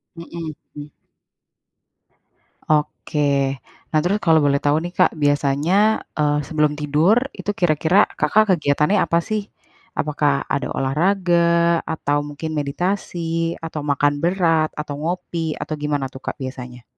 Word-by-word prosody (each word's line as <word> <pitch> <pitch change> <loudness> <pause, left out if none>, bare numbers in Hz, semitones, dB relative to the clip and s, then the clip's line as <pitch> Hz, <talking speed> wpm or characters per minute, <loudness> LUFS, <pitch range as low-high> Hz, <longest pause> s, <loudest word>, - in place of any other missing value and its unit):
Mhm, 165 -1 -7 0.2
mmm. 145 0 -9 1.8
Oke. 145 -2 0 0.3
Nah 155 - +2
terus 200 +4 0
kalau 160 -3 +4
boleh 140 0 +2
tahu 145 +1 +2
nih, 175 - -6
Kak, - - +3
biasanya, 150 +8 +2
eee, 150 -1 +1
sebelum 150 -2 +1
tidur 150 +8 +3 0.2
itu - - -7
kira-kira 170 +4 +3
Kakak 215 -2 +3
kegiatannya 150 +4 +2
apa 170 - +1
sih? 215 +2 -2 0.6
Apakah 145 -2 0
ada 140 - -2
olahraga, 170 +2 +2
atau 145 -2 -1
mungkin 145 +2 -6
meditasi, 165 +2 -2
atau 160 -2 -5
makan 145 0 +1
berat, 165 -3 +2
atau 150 -1 -4
ngopi 165 -1 -3
atau - - -4
gimana 145 -2 -2
tuh 130 0 -12
Kak - - -4
biasanya? 125 -2 -7
155 Hz, 125 wpm, -21 LUFS, 145-170 Hz, 1.8 s, kalau